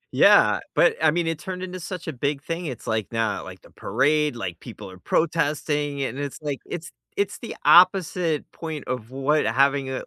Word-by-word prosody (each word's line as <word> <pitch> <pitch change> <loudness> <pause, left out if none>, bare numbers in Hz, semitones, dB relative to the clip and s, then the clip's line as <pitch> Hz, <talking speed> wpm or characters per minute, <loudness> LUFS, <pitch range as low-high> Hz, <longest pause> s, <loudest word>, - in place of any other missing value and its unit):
Yeah, - - +6 0.2
but, - - +4
I 155 - +6
mean, 170 +2 0
it 165 -2 -2
turned 185 0 -6
into 185 0 -6
such 180 0 -7
a 160 - -3
big 140 +2 -2
thing, 165 +1 -4
it's 130 -5 -7
like 110 -2 -2
now, 115 -2 -1
like, - - -11
the - - -18
parade, 150 -1 +1
like, 90 -8 -5
people 105 -4 -10
are 95 - -13
protesting, 150 - 0
and 130 +1 -4
it's 145 -1 -4
like 145 -3 -3
it's 170 0 -6 0.2
it's 200 0 -1
the 235 - -7
opposite 180 -3 +4
point 160 -3 -6
of 125 -2 -4
what 135 +3 +1
having 135 +4 +2
a 130 - -4
150 Hz, 195 wpm, -24 LUFS, 130-165 Hz, 0.2 s, Yeah